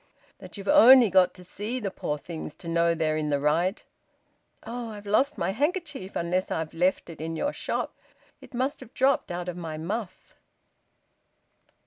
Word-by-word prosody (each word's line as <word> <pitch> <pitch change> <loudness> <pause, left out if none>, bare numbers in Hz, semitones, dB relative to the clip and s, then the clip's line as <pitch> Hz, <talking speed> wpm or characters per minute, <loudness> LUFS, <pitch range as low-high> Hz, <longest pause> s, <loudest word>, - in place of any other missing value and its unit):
"That - - -11
you've 200 0 -8
only 245 -2 +8
got 185 -1 +4
to 180 - -12
see 210 +7 -4
the 200 -5 -3
poor 150 -5 -3
things 155 0 -7
to 170 - -11
know 170 0 +2
they're 155 -1 0
in 155 -1 -1
the 145 -1 +1
right! 165 +8 +1 0.8
Oh! 235 0 -5
I've 210 -1 -9
lost 270 +8 +2
my 170 +3 0
handkerchief, 295 - -2
unless 180 +2 -1
I've 160 -1 -3
left 180 +3 +1
it 165 -2 -9
in 165 +1 -3
your 290 - -1
shop. - - -3 0.5
It 265 - -12
must 260 +3 -1
have 230 - -13
dropped 270 +1 +2
out 175 0 -4
of 180 -1 -4
my 160 -3 -5
muff." 195 +5 -5
185 Hz, 175 wpm, -27 LUFS, 165-235 Hz, 0.8 s, only